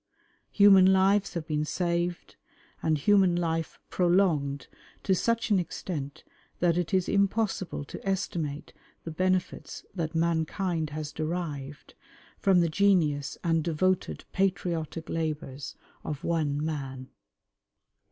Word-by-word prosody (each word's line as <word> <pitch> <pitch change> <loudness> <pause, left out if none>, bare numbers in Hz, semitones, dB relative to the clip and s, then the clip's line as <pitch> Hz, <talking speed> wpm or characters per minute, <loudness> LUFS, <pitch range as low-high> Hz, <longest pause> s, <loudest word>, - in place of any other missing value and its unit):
Human 195 -2 +7
lives 195 +1 +3
have 165 -2 -3
been 150 -1 -1
saved, 175 +2 -2 0.5
and 160 -1 +2
human 190 +3 +4
life 165 -2 -2
prolonged 170 -7 +2 0.4
to 190 - +2
such 230 +4 0
an 200 - +5
extent 150 -5 -5 0.4
that 175 -2 +3
it 175 -2 -1
is 185 -2 +2
impossible 200 -5 0
to - - -9
estimate 170 -7 -3 0.3
the 165 - -5
benefits 185 +2 -1
that 165 -3 -3
mankind 165 0 0
has 150 0 -5
derived 155 -4 -5 0.5
from 190 -3 +4
the 170 - +3
genius 155 -6 +2
and 165 -2 +2
devoted 180 +3 0
patriotic 175 -4 -1
labours 150 -4 -4 0.3
of 150 -2 -5
one 155 -3 0
man. 135 -4 -5
170 Hz, 115 wpm, -28 LUFS, 155-185 Hz, 0.5 s, Human